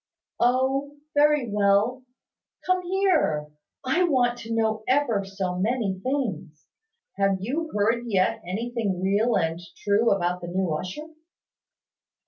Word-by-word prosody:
"Oh, 265 +4 +1 0.2
very 295 -3 +3
well. 205 +4 +2 0.6
Come 370 0 +2
here. 360 - +1 0.4
I 265 +8 +2
want 245 -7 +2
to 225 - -8
know 220 -1 0
ever 255 -7 +2
so 195 -2 -3
many 210 -2 0
things. 200 - -3 0.5
Have 195 -1 +2
you 290 - -3
heard 225 +4 +1
yet 190 -4 +1
anything 210 +1 -2
real 205 +5 +2
and 165 +1 -1 0.2
true 210 +3 +3
about 180 -2 0
the 175 - -6
new 180 0 -1
usher?" 185 - -5
220 Hz, 120 wpm, -25 LUFS, 190-260 Hz, 0.6 s, very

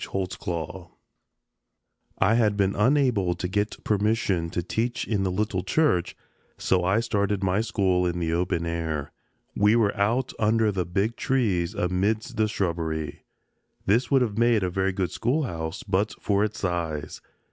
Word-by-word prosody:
HOLTZCLAW 90 -2 -4 1.3
I 95 +3 +3
had 110 -3 +2
been 100 -1 +2
unable 110 -6 +2
to 90 - -3
get 105 +3 -2
permission 105 -5 +1
to 85 - -2
teach 115 +7 -2
in 105 -4 0
the 95 - +1
little 95 0 -1
church, 95 - +1 0.4
so 90 -1 +1
I 95 +5 +2
started 100 -3 0
my 95 +2 +2
school 95 -6 +1
in 85 0 -2
the 85 -1 -1
open 85 -1 0
air. 80 -3 -3 0.4
We 105 +2 +4
were 110 -4 +2
out 115 +6 0
under 110 0 +3
the 90 -3 -2
big 100 +6 -1
trees 100 -8 0
amidst 105 +7 0
the 110 0 +2
shrubbery. 80 -6 -3 0.6
This 115 +6 +2
would 135 -2 +4
have 110 -2 -2
made 115 -3 +3
a 90 - -1
very 95 +1 0
good 95 -1 -2
schoolhouse 115 - -2
but 100 +2 0
for 100 0 +1
its 110 0 -2
size. 80 -5 -3
100 Hz, 155 wpm, -26 LUFS, 90-110 Hz, 1.3 s, We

